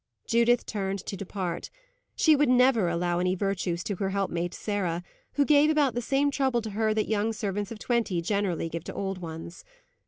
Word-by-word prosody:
Judith 235 +1 +3
turned 195 -2 -2
to - - -4
depart. 185 -2 -4 0.5
She 315 - +5
never 255 -6 +4
would 170 - 0
allow 175 0 0
any 180 +1 +1
virtues 185 -3 -1
to 200 -1 -3
her 195 +1 -1
helpmate 180 -3 -2
Sarah, 180 -5 -2 0.3
who 285 - +2
gave 295 +1 +5
about 295 -5 +3
the 240 - -2
same 275 +4 +1
trouble 265 -4 +1
to 220 - -5
her 215 +1 +1
that 215 0 +1
young 220 +1 0
servants 205 -1 -3
of 230 - -6
twenty 225 -6 0
generally 185 -2 -1
give 165 0 -5
to - - -7
old 195 -1 -3
ones. 165 0 -8
205 Hz, 190 wpm, -27 LUFS, 180-235 Hz, 0.5 s, She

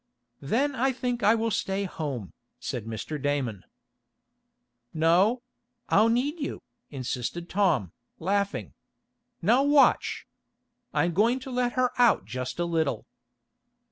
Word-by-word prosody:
"Then 255 - +1
I 265 +2 +1
think 245 -1 -2
I 215 +2 +5
will 225 0 -1
stay 195 0 -1
home," 145 - -5 0.3
said 115 -4 -4
Mr. 115 +7 -5
Damon. 130 -9 -1 1.3
"No; 185 +10 +3 0.5
I'll 220 +3 +5
need 275 +8 0
you," 285 - -4 0.3
insisted 130 +5 -4
Tom, 185 - +1 0.3
laughing. 200 +3 -1 0.7
"Now 235 +9 +4
watch. 285 0 +3 0.7
I'm 175 0 +1
going 230 +8 +3
to 265 0 -7
let 245 -1 0
her 255 -1 +2
out 240 -2 +4
just 125 0 -5
a 175 - 0
little." 160 -8 -1
195 Hz, 120 wpm, -27 LUFS, 145-245 Hz, 1.3 s, I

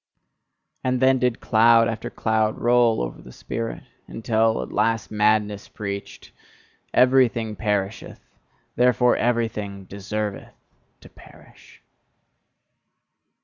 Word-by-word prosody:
And 130 0 0
then 130 0 +3
did 125 -2 0
cloud 115 +1 +4
after 115 -1 -4
cloud 110 -1 0
roll 120 - +2
over - - -7
the 65 - -13
spirit, 115 - -6 0.2
until 110 - 0
at - - -10
last 115 -1 0
madness 105 -1 +1
preached: 100 -1 -7 0.6
"Everything 125 -4 +3
perisheth, 105 -1 -3 0.5
therefore 125 0 +3
everything 110 -5 -2
deserveth 100 +2 -5 0.5
to - - -15
perish!" - - -19
110 Hz, 100 wpm, -23 LUFS, 105-120 Hz, 0.6 s, cloud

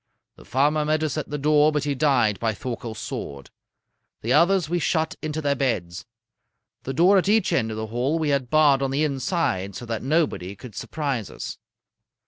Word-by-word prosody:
The - - -16
farmer 150 +4 +2
met 155 +1 0
us 155 -4 -1
at 155 - -4
the 150 - -3
door, 150 +1 +4
but 150 -2 -1
he 145 -1 0
died 130 -7 +2
by 110 -2 -1
Thorkel's 120 -1 -6
sword. 70 -8 -6 0.7
The 120 +3 0
others 175 0 +4
we 175 +2 0
shut 160 -1 0
into 155 0 -3
their 140 -1 +2
beds. 95 -11 -2 0.8
The 135 - -2
door 185 +6 +5
at 190 - -1
each 215 -2 +3
end 115 -4 +1
of 110 - -5
the 110 - -3
hall 125 +8 -1
we 155 -2 0
had 140 -4 0
barred 145 -2 +4
on 135 - 0
the 140 +3 0
inside 135 - -1
so 120 - -7
that 115 -1 -3
nobody 135 - 0
could 115 +2 -11
surprise 135 - -3
us. - - -7
140 Hz, 195 wpm, -24 LUFS, 115-155 Hz, 0.8 s, door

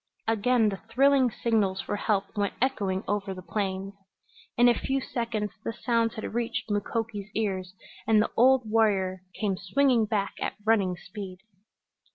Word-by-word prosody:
Again 225 +1 +3
the 195 -1 -5
thrilling 270 +1 +4
signals 215 -5 0
for 205 - -3
help 205 0 -1
went 205 -1 -1
echoing 205 -7 0
over 200 -2 -2
the 185 - -9
plains. 195 -1 -3 0.6
In 240 +1 +6
a 240 - +6
few 270 +3 -1
seconds 230 -5 -3
the 230 - -3
sounds 230 -1 0
had 220 - -5
reached 235 -1 -2
Mukoki's 205 0 -2
ears 190 -4 -2 0.3
and 220 -1 +5
the 215 - +1
old 255 0 +5
warrior 200 -4 +2 0.2
came 200 -4 0
swinging 235 +4 +2
back 205 -2 -1
at - - -2
running 200 -5 +2
speed. 185 0 -8
215 Hz, 155 wpm, -27 LUFS, 195-235 Hz, 0.6 s, In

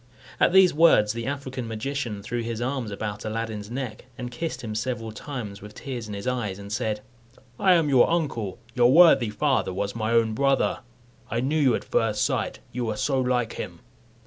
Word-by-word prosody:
At - - +4
these 190 -1 +6
words 145 -10 +5
the 115 +1 -4
African 135 -3 -4
magician 115 -2 -4
threw 120 +2 -3
his 115 -1 -4
arms 125 -2 -2
about 105 +1 -5
Aladdin's 110 -1 -4
neck, 125 -3 -5
and 125 -1 -5
kissed 160 +4 -4
him 110 -2 -4
several 115 0 -3
times, 110 -5 -7
with 105 +1 -11
tears 125 -5 -6
in 105 - -5
his 100 - -6
eyes, 120 -7 -2
and 100 0 -7
said, 105 -1 -1 0.6
"I 185 -2 +5
am 165 -3 +3
your 130 -4 +5
uncle. 135 - -1 0.2
Your 120 +1 +4
worthy 160 -7 +7
father 120 0 +1
was 100 +3 -3
my 110 -1 -1
own 115 -1 +3
brother. 135 +2 +2 0.5
I 115 - -1
knew 145 +6 0
you 130 -5 +4
at - - -4
first 110 -2 +1
sight, - - -2
you 120 -2 -2
are 105 - -3
so 135 +4 +1
like 125 -3 0
him." - - -7
120 Hz, 195 wpm, -25 LUFS, 110-135 Hz, 0.6 s, worthy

